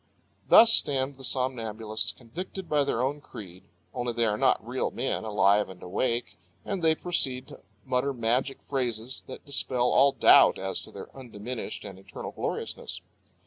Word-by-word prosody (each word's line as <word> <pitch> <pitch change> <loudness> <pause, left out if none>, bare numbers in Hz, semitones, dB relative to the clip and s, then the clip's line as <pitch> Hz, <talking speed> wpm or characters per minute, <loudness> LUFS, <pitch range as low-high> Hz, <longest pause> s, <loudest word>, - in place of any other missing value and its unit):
Thus 225 0 +8
stand 135 -4 +3
the 135 - -12
somnambulists 115 -5 -1
convicted 175 +9 -8
by 150 -1 +2
their 125 -3 -1
own 145 +3 -2
creed 95 -8 -11 0.3
only 125 -2 -2
they 120 0 +2
are 105 -2 +1
not 130 -1 +1
real 130 +2 -1
men, 130 -1 -2
alive 105 -1 +2
and 95 -1 -12
awake, 115 +4 -2 0.3
and 195 -3 -3
they 160 -1 +4
proceed 135 -7 -1
to - - -12 0.3
mutter 130 +2 0
magic 125 +2 -1
phrases 125 -2 -3
that 130 - -10
dispel 125 -3 0
all 140 +1 +5
doubt - - +6
as - - -2
to - - -8
their - - -11
undiminished 120 -2 -7
and 95 -1 -9
eternal 95 - -8
gloriousness. - - -4
125 Hz, 160 wpm, -27 LUFS, 110-135 Hz, 0.3 s, Thus